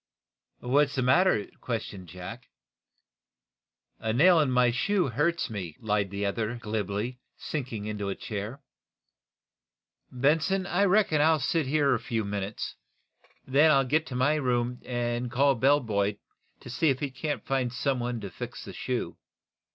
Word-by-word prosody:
"What's 140 Hz, +3 st, +2 dB
the 130 Hz, -, +1 dB
matter?" 130 Hz, -, +4 dB
questioned 105 Hz, -6 st, -5 dB
Jack. 90 Hz, +8 st, -9 dB, 1.5 s
"A 110 Hz, -, -1 dB
nail 165 Hz, +9 st, +6 dB
in 150 Hz, -3 st, +2 dB
my 125 Hz, -1 st, +4 dB
shoe 180 Hz, -, +1 dB
hurts 155 Hz, +8 st, 0 dB
me," 95 Hz, -8 st, -6 dB
lied 105 Hz, -2 st, 0 dB
the 100 Hz, +1 st, -3 dB
other, 110 Hz, +3 st, -1 dB
glibly, 110 Hz, +1 st, -3 dB, 0.2 s
sinking 120 Hz, -8 st, -4 dB
into 105 Hz, -2 st, -3 dB
a 95 Hz, -, -2 dB
chair. 110 Hz, +5 st, -6 dB, 1.5 s
"Benson, 160 Hz, +9 st, +1 dB
I 195 Hz, +1 st, +2 dB
reckon 195 Hz, -6 st, +3 dB
I'll 160 Hz, +1 st, +5 dB
sit 150 Hz, +1 st, 0 dB
here 140 Hz, -1 st, +3 dB
a 120 Hz, -, +1 dB
few 110 Hz, -1 st, -2 dB
minutes. 100 Hz, +1 st, -4 dB, 0.7 s
Then 145 Hz, +4 st, +5 dB
I'll 135 Hz, -3 st, +4 dB
get 155 Hz, +5 st, +1 dB
to 125 Hz, -, -6 dB
my 130 Hz, +4 st, +3 dB
room 125 Hz, -4 st, 0 dB
and 120 Hz, 0 st, -2 dB
call 140 Hz, +4 st, +3 dB
a -, -, +1 dB
bell 140 Hz, +5 st, +4 dB
boy, 105 Hz, -2 st, 0 dB, 0.4 s
to -, -, -10 dB
see 155 Hz, +5 st, +2 dB
if 135 Hz, -1 st, +1 dB
he 140 Hz, -2 st, -3 dB
can 145 Hz, +3 st, -3 dB
find 130 Hz, -3 st, -1 dB
some 130 Hz, +1 st, -1 dB
one 120 Hz, -1 st, -2 dB
to 100 Hz, -2 st, -6 dB
fix -, -, -7 dB
the -, -, -8 dB
shoe." -, -, -3 dB
125 Hz, 160 wpm, -28 LUFS, 110-145 Hz, 1.5 s, nail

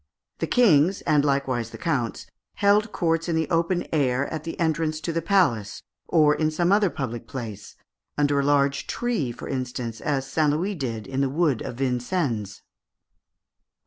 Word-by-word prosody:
The -, -, -1 dB
Kings, 190 Hz, -6 st, +4 dB
and 150 Hz, -2 st, +2 dB
likewise 135 Hz, -5 st, 0 dB
the -, -, -10 dB
counts, 125 Hz, -, -2 dB, 0.3 s
held 205 Hz, +2 st, +3 dB
courts 165 Hz, 0 st, 0 dB
in 165 Hz, -, +1 dB
the 160 Hz, -1 st, 0 dB
open 170 Hz, +2 st, +1 dB
air 135 Hz, -3 st, +1 dB
at 155 Hz, 0 st, -5 dB
the 165 Hz, -, -6 dB
entrance 160 Hz, -1 st, 0 dB
to 165 Hz, -, -3 dB
the 165 Hz, -, 0 dB
palace 160 Hz, -, +1 dB, 0.2 s
(Fig. -, -, -21 dB
302), -, -, +2 dB
or 150 Hz, -1 st, +5 dB
in 155 Hz, -, +3 dB
some 175 Hz, +3 st, +1 dB
other 205 Hz, -1 st, +4 dB
public 120 Hz, -6 st, -5 dB
place 110 Hz, -6 st, -7 dB, 0.4 s
under 145 Hz, -1 st, +2 dB
a -, -, +1 dB
large 140 Hz, -1 st, +2 dB
tree, 230 Hz, -, -1 dB
for 120 Hz, -, -8 dB
instance, 125 Hz, -3 st, -4 dB
as 135 Hz, -3 st, -1 dB
St. 150 Hz, +2 st, +1 dB
Louis 175 Hz, +8 st, 0 dB
did 120 Hz, -, -4 dB
in 135 Hz, 0 st, -2 dB
the 135 Hz, -, +1 dB
wood 145 Hz, -4 st, +1 dB
of -, -, -5 dB
Vincennes. 125 Hz, -, -2 dB
145 Hz, 175 wpm, -25 LUFS, 125-165 Hz, 0.4 s, or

